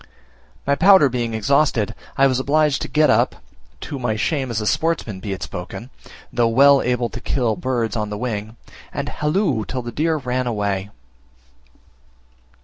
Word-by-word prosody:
My 140 - +2
powder 175 -2 +6
being 120 -2 -2
exhausted, 115 -2 +1 0.2
I 135 - +5
was 130 -2 +2
obliged 150 +1 +2
to - - -3
get 155 0 +3
up - - +2 0.5
(to 140 - -6
my 120 -3 -1
shame 135 +4 -1
as 115 -2 -1
a 105 - -3
sportsman 150 - -1
be 100 +1 -5
it 95 - -4
spoken, 100 +8 -7 0.4
though 120 -1 +2
well 140 +4 +5
able 125 -1 0
to - - -8
kill 120 -5 0
birds 120 -4 -2
on 105 -2 -2
the 105 - -4
wing) 110 -2 -4 0.4
and - - -4
halloo 150 - 0
till 125 +3 -5
the 120 - -5
deer 155 +6 0
ran 125 -2 -2
away. 100 -3 -2
125 Hz, 165 wpm, -21 LUFS, 110-140 Hz, 0.5 s, powder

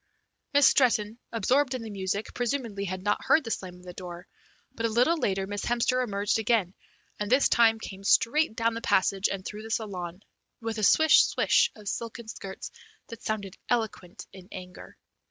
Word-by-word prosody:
Miss 285 -1 +7
Stretton, 230 -4 +2
absorbed 260 +3 +1
in 245 - -5
the 220 - -7
music, 200 +1 -3
presumably 235 -5 -2
had 185 0 -5
not 205 0 0
heard 315 - +4
the 225 - -5
slam 185 -4 -4
of 180 - -16
the 180 -1 -9
door, 175 -1 -9 0.5
but 230 -3 -1
a - - -3
little 245 +9 +3
later 195 - -1
Miss 205 +1 -4
Hemster 240 +1 +1
emerged 205 -1 0
again, 215 -5 +1 0.5
and 210 +1 -3
this 265 +2 +5
time 225 -1 +4
came 195 -3 -9
straight 230 +5 +3
down 230 0 +1
the 230 - -5
passage 195 -1 +2
and 195 -1 -5
through 210 0 -6
the 220 - -9
saloon, 190 -4 -4 0.4
with 225 -1 -4
a - - -2
swish, 315 +8 +6
swish - - +3
of 210 -2 -13
silken 230 +1 -5
skirts 195 -3 -7 0.4
that 230 - -9
sounded 200 -3 -4
eloquent 220 -7 -2
in 185 -1 -13
anger. 180 -1 -10
215 Hz, 185 wpm, -27 LUFS, 195-235 Hz, 0.5 s, Miss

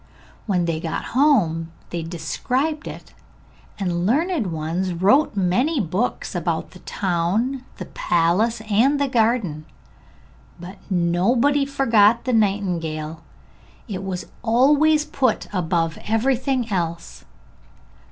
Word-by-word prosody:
When 180 -4 +1
they 165 -2 -1
got 160 0 -3
home 190 - +2 0.2
they 170 - -3
described 250 - -2
it, - - -10 0.6
and 195 -3 -1
the - - -2
learned 260 - +1
ones 165 +4 -2
wrote 210 - +3
many 225 - +1
books 200 +4 -2
about - - -2
the - - -14
town, 200 +8 -1
the - - -6
palace 185 +7 +1
and 225 +7 +2
the 285 - +1
garden; 220 - 0 0.9
but 180 +3 -9
nobody 220 +11 +2
forgot 235 -5 +3
the 255 - 0
nightingale, 170 -7 -1 0.7
it 195 -4 -5
was 185 -2 -4 0.2
always 295 +6 +3
put 260 -7 0
above 165 -3 -1
everything 250 +1 0
else. 170 -3 -3
205 Hz, 115 wpm, -22 LUFS, 170-255 Hz, 0.9 s, wrote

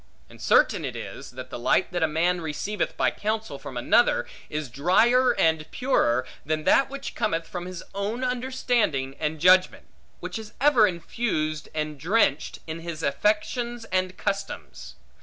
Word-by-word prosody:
And - - -14
certain - - +3
it - - -4
is, - - -7
that 130 0 -9
the - - -5
light 175 +10 +2
that 175 - -2
a 160 - +4
man 170 +3 +1
receiveth 165 +7 -3
by - - +2
counsel 215 -8 -3
from - - -8
another, - - +3 0.2
is 150 -1 -3
drier 225 - +3
and 160 -1 +1
purer, 130 - +1 0.2
than 155 +1 -1
that 270 - +4
which 275 0 -6
cometh 165 -6 -1
from 175 +1 -6
his 185 -2 -7
own 205 +6 -3
understanding 245 - 0
and 155 0 -2
judgment; 185 +3 +4 0.3
which - - -5
is 220 -1 -10
ever 255 -6 +5
infused, 165 -4 -2
and 150 -2 -3
drenched, 165 -2 +1
in 160 0 -5
his 165 -1 -6
affections 215 - 0
and 185 0 0
customs. 65 - -4
180 Hz, 160 wpm, -25 LUFS, 155-220 Hz, 0.3 s, ever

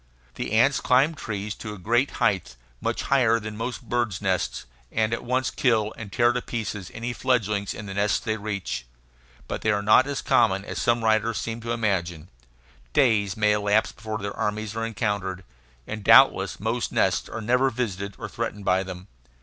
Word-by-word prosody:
The - - -4
ants 125 +5 +4
climb 135 +6 +3
trees 105 -7 -4
to 105 -2 -6
a - - -11
great 120 +8 +1
height, 95 - 0 0.3
much - - -1
higher 120 -4 +3
than 110 -1 -7
most 120 +4 -4
birds' 120 -7 -1
nests, 95 -9 -1 0.3
and 110 0 +1
at - - -3
once 130 +2 0
kill 110 -4 +1
and 105 -3 -8
tear 120 +2 +3
to 125 - -1
pieces 105 -6 -4
any 120 +2 -3
fledglings 105 -6 0
in 105 - -7
the 95 - -6
nests 100 +1 +1
they 110 -3 -2
reach. 100 - -4 0.6
But - - -4
they 110 - 0
are 105 -1 +1
not 110 +6 +5
as 140 -1 -3
common 95 +1 +3
as - - -5
some 120 -1 +1
writers 110 0 +2
seem 115 0 -4
to 115 +1 -4
imagine; 90 -8 -1 0.6
days 105 -5 +3
may 105 -1 +3
elapse 105 +1 +2
before 110 -1 -5
their 100 0 -5
armies 105 0 -2
are 115 - -2
encountered, 100 -5 -2 0.4
and 105 -1 -6
doubtless 115 -4 +6
most 115 +4 -1
nests - - +1
are - - -5
never 125 +4 +2
visited 100 -6 -3
or - - -6
threatened 105 -1 -5
by 95 +1 +3
them. 95 0 -8
110 Hz, 185 wpm, -25 LUFS, 100-120 Hz, 0.6 s, doubtless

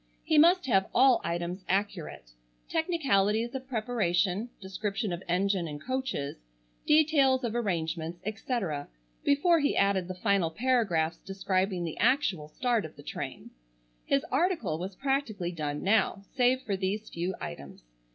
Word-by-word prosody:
He 315 -1 +3
must 350 +3 +5
have 195 -7 +2
all 260 0 +6
items 175 +2 -3
accurate; 190 - -2 0.4
technicalities 235 - +1
of 260 -1 -6
preparation; 215 -4 0
description 195 0 -3
of 175 - -5
engine 185 0 +1
and 145 -1 -6
coaches; 260 - -3 0.5
details 285 -4 +4
of 235 -2 -1
arrangements, 170 -6 -2
etc.; 210 - -3 0.4
before 330 +4 +4
he 285 -1 +1
added 195 -2 +2
the 185 - -5
final 195 -3 +1
paragraphs 200 -6 +1
describing 190 -1 -1
the 165 -2 -5
actual 225 - +2
start 235 +6 0
of - - -9
the - - -13
train. - - -6 0.5
His 275 +3 +1
article 270 - +1
was 185 +2 -5
practically 265 -10 -1
done 150 -3 -4
now, 200 -1 +2
save 255 0 +3
for 200 - -1
these 195 +3 -2
few 175 +2 -3
items. 70 -4 -8
200 Hz, 140 wpm, -29 LUFS, 175-255 Hz, 0.5 s, all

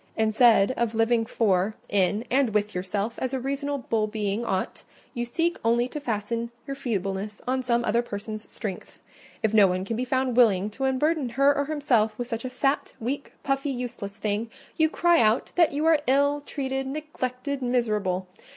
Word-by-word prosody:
Instead 220 0 +5
of 235 -3 -1
living 225 0 +2
for, 200 -2 +1
in, 205 +3 +1
and 255 -4 +2
with 210 0 +1
yourself, 200 +5 -3
as 260 +1 -2
a - - -1
reasonable 275 -4 -1
being 210 0 -2
ought, 190 -5 -2 0.3
you 240 -3 -2
seek 330 +8 -1
only 235 +2 +2
to 300 - -6
fasten 230 -2 -2 0.2
your 275 - -4
feebleness 205 -5 -3
on 260 +1 +1
some 240 -2 +1
other 235 +2 +2
person's 215 -1 -7
strength: 195 -5 -6 0.4
if 220 -1 +1
no 210 -3 +7
one 185 +1 -1
can 225 - -2
be 245 - -1
found 260 -1 0
willing 210 -4 +4
to 265 +4 0
burden 300 0 +1
her 275 +4 +3
or 285 - 0
himself 250 -8 +1
with 245 - -4
such 230 -2 -4
a 255 - -3
fat, 270 +2 0
weak, 270 +5 -4
puffy, 275 +1 0
useless 245 -6 -5
thing, 215 +2 -2 0.3
you 315 0 +3
cry 345 -1 +3
out 220 +2 +2
that 345 -2 +4
you 295 +2 -1
are 320 -2 +4
ill 285 +2 +3
treated, 270 -2 -3
neglected, 280 -2 -4
miserable. 210 -7 0
235 Hz, 180 wpm, -26 LUFS, 215-270 Hz, 0.4 s, no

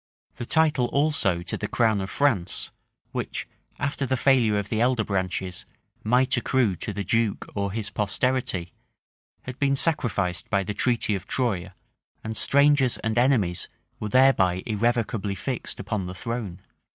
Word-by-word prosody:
The 120 - -5
title 155 -6 +3
also 140 - +1
to - - -4
the 105 - -3
crown 110 -4 +2
of 95 - -4
France, 105 -11 0 0.4
which, - - -4 0.3
after 140 0 -2
the 130 - +1
failure 125 -6 +3
of 100 0 -3
the 110 0 0
elder 125 -2 +2
branches, 95 -2 -3 0.4
might 125 +4 +3
accrue 125 -5 +1
to - - -4
the 100 - -4
duke 115 +1 0
or 100 -1 -2
his 105 0 -4
posterity, 105 -3 -1 0.7
had 125 +1 -8
been 140 -1 +2
sacrificed 110 - 0
by 100 -2 +1
the 105 - -4
treaty 120 0 +1
of 95 -2 -4
Troye; 100 -8 -1 0.5
and 110 0 -4
strangers 140 0 +4
and 110 0 0
enemies 115 -10 +2 0.3
were 105 - -3
thereby 100 -8 +4
irrevocably 110 -2 0
fixed 130 +3 -4
upon 100 -1 -3
the 90 +1 -6
throne. 110 -3 -5
110 Hz, 150 wpm, -25 LUFS, 100-130 Hz, 0.7 s, strangers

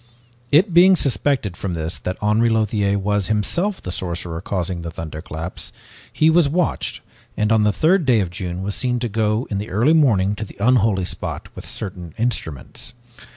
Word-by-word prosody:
"It 170 +6 +4
being 185 +2 +7
suspected 130 - 0
from 90 0 -4
this 80 +1 -4
that 90 - -4
Henri 110 +3 +3
Lothiere 105 -3 +1
was 105 0 0
himself 170 - 0
the 90 - -4
sorcerer 85 -2 -4
causing 90 -2 -3
the 85 - -5
thunderclaps, 80 +1 -7 0.4
he 155 - +2
was 160 -2 +4
watched 175 +3 -1 0.4
and 105 0 +1
on 110 -1 +4
the 105 0 +3
third 165 - +3
day 125 -5 +3
of 90 -4 -1
June 90 -1 -5
was 100 +1 -2
seen 125 +1 0
to 120 0 -2
go 110 +1 0
in 100 - -1
the 105 - -5
early 120 - +3
morning 105 -11 +3
to - - -3
the 110 - -11
unholy 110 -4 +3
spot - - -5
with - - -9
certain 90 -5 -6
instruments. 110 - -4
105 Hz, 180 wpm, -21 LUFS, 90-125 Hz, 0.4 s, being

